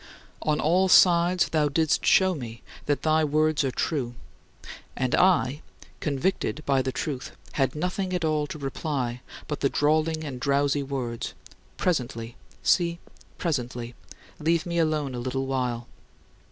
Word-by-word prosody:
" - - -30
On 150 - +1
all 185 +4 +3
sides, 175 0 +5
thou 150 -2 +2
didst 160 +1 +1
show 190 -1 +5
me 120 -7 -7 0.2
that 145 -1 0
thy 155 0 +3
words 155 0 +2
are 135 - +1
true, 125 -1 -2 0.8
and 130 -2 -1
I, 160 -6 +3 0.4
convicted 155 +1 -1
by 135 -1 +3
the 130 0 -2
truth, 135 0 -4 0.2
had 135 -1 0
nothing 180 +4 -2
at 180 -2 0
all 155 -1 +1
to 155 - -6
reply 135 -3 -3 0.3
but 150 - -3
the 140 - +2
drawling 155 +2 +1
and 135 -5 -5
drowsy 140 +1 +1
words: 130 -4 -4 0.4
"Presently; 120 -8 -1 0.3
see, 170 -2 +3 0.4
presently. 125 -6 -2 0.5
Leave 165 +2 +1
me 170 -1 -1
alone 155 -4 0
a 125 - -4
little 130 +2 -2
while." 125 -3 -2
145 Hz, 145 wpm, -26 LUFS, 130-160 Hz, 0.8 s, sides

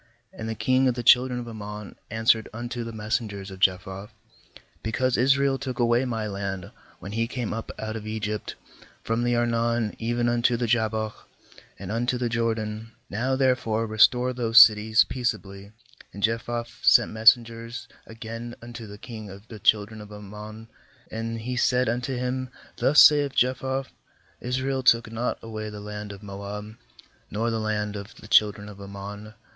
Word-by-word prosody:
"And 110 - -6
the 110 - -3
king 130 +4 +2
of 125 - +1
the 120 - -4
children 125 +1 +5
of 120 - -7
Ammon 105 -2 -8
answered 110 0 +2
unto 120 +2 -5
the 115 - -6
messengers 105 -3 -3
of 95 - -10
Jephthah: 95 +2 0 0.7
'Because 125 +3 0
Israel 135 +1 +3
took 130 -3 -5
away 120 +1 +2
my 115 -3 -2
land, 100 -3 -4 0.3
when 100 - -9
he 115 +2 0
came 125 -2 -3
up 115 0 -5
out 110 0 -4
of 110 -1 -6
Egypt, 105 -1 -3 0.5
from 115 +1 0
the 120 0 +2
Arnon 115 -1 0
even 120 +1 0
unto 120 0 +2
the 120 - -1
Jabbok, 110 -1 -1 0.5
and - - -7
unto 120 +3 0
the 120 -1 -1
Jordan; 110 -1 -2 0.2
now 125 +6 0
therefore 125 -4 +1
restore 125 +3 +4
those 120 -1 0
cities 110 0 +7
peace 125 -3 0
ably.' 100 +1 -12 0.4
14And 100 - -7
Jephthah 115 +2 0 0.2
sent - - +5
messen 115 +2 +6
gers 115 +1 -8 0.2
again 115 +1 -7
unto 120 -1 -9
the 100 0 -10
king 110 -1 -9
of 100 +3 -12
the 110 - -9
children 105 +2 +2
of 105 0 -12
Ammon; 105 +2 -9 0.4
16and 115 +1 -4
he 125 +3 -3
said 125 0 +2
unto 125 +3 -1
him: 125 +1 -2
' - - -25
Thus 150 +2 +7
saith 145 -2 +5
Jephthah: 130 +2 +1 0.5
Israel 130 +2 -1
took 115 -3 +4
not 115 +2 -2
away 110 -1 -5
the 105 0 -8
land 105 0 -7
of 100 +1 -11
Moab, 100 +2 -7 0.5
nor 115 +3 -1
the 115 - -1
land 105 -1 -2
of 100 +1 -8
the - - -13
children 105 -1 +3
of 100 -1 -11
Ammon. 100 +2 -8
115 Hz, 170 wpm, -25 LUFS, 105-120 Hz, 0.7 s, cities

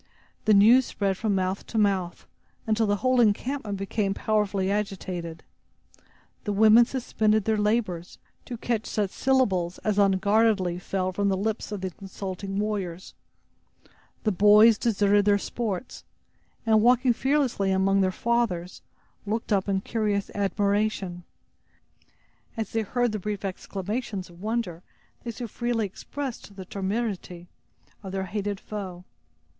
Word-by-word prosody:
The 215 - +5
news 235 +6 +6
spread 195 -2 -1
from 210 +1 0
mouth 185 +1 -2
to 225 - -4
mouth, 195 -4 0 0.4
until 220 0 +1
the 205 - +2
whole 255 -1 +4
encampment 220 0 0
became 195 0 -1
powerfully 205 -3 0
agitated. 185 -5 -4 1.0
The 205 - -2
women 220 +3 +6
suspended 220 -5 0
their 220 - +2
labors, 210 -5 -1 0.3
to 240 - -6
catch 225 -1 -2
such 205 -3 -1
syllables 195 -10 +1
as 210 -1 +1
unguardedly 200 -1 +3
fell 185 0 -2
from 200 +2 +1
the 190 - +1
lips 220 +2 -2
of 205 -2 -4
the 190 -1 -3
consulting 195 +1 -6
warriors. 195 -4 -3 1.1
The 215 - +2
boys 210 +3 +6
deserted 205 -3 +3
their 205 -1 +4
sports, 220 +1 -4 0.6
and 220 -1 +4
walking 250 +2 +4
fearlessly 265 -7 +1
among 195 +1 +3
their 185 -1 +2
fathers, 205 -6 -1 0.5
looked 220 +1 -1
up 195 0 +1
in 190 -1 +1
curious 210 -2 -1
admiration, 200 -2 -1 1.3
as 220 -3 -3
they 225 - 0
heard 245 +3 0
the 215 - -3
brief 205 0 -4
exclamations 195 +1 -4
of 170 +1 -16
wonder 215 -6 -2 0.4
they 240 - -5
so 235 +1 -5
freely 235 0 -1
expressed 235 +1 -7
the 190 -1 -8
temerity 190 -3 -4 0.5
of 195 -2 -7
their 190 0 -2
hated 205 +1 -3
foe. 185 -4 -7
205 Hz, 135 wpm, -26 LUFS, 190-220 Hz, 1.3 s, news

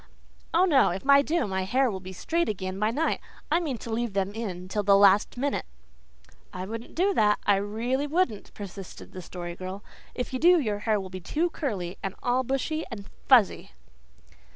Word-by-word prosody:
"Oh, 350 +3 +4
no; 295 -7 +4
if 190 +8 -5
I 280 0 +7
do 310 -1 0
my 190 -2 -2
hair 250 +5 +2
will 190 - -4
be 185 0 -9
straight 335 - -1
again 190 -2 -4
by 210 +1 +2
night. 295 +8 0 0.3
I 330 - +4
mean 295 -8 -3
to 230 - -8
leave 235 -2 -1
them 195 0 -1
in 190 -5 -5
till 210 +3 -1
the 200 -1 +5
last 200 +3 +5
minute." 280 +3 -1 0.8
"I 185 0 -5
wouldn't 225 +3 -7
do 390 +4 +2
that 210 - +3
I 200 -1 +4
really 235 +8 -1
wouldn't," 290 - -1
persisted 195 -2 -9
the 185 - -8
Story 175 0 -7
Girl. 185 +3 -7 0.3
"If 250 +1 -4
you 255 - -1
do 350 +3 +6
your 210 -7 -1
hair 215 -1 +3
will 190 -1 -7
be 185 0 -7
too 330 - -1
curly 195 - -4
and 195 - -4
all 250 +1 +2
bushy 270 +5 -1
and 200 -5 -8 0.2
fuzzy." 245 -7 +4
215 Hz, 200 wpm, -27 LUFS, 190-275 Hz, 0.8 s, I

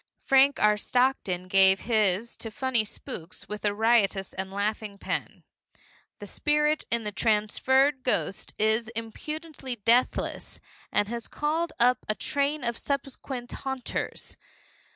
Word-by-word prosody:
Frank 275 +1 +5
R. 210 0 +4
Stockton 210 -7 0
gave 190 0 +5
his 215 -1 +1
to 225 - -5
funny 260 -2 +1
spooks 180 -4 -8
with 210 0 -6
a 205 - +2
riotous 205 -3 +2
and 190 0 -4
laughing 205 +1 -2
pen. - - -4 0.7
The - - -9
spirit 300 0 +1
in 230 -1 0
his 210 - -3
Transferred 260 +6 +2
Ghost 250 -6 -1
is 220 +1 +2
impudently 270 +4 -5
deathless, 235 +3 +1 0.3
and 205 - +2
has 235 +1 -5
called 315 +3 -1
up 250 +1 +4
a 215 - +2
train 285 +1 -1
of 235 -1 -2
subsequent 265 -2 -4
haunters. 265 -2 -4
235 Hz, 130 wpm, -27 LUFS, 210-265 Hz, 0.7 s, Frank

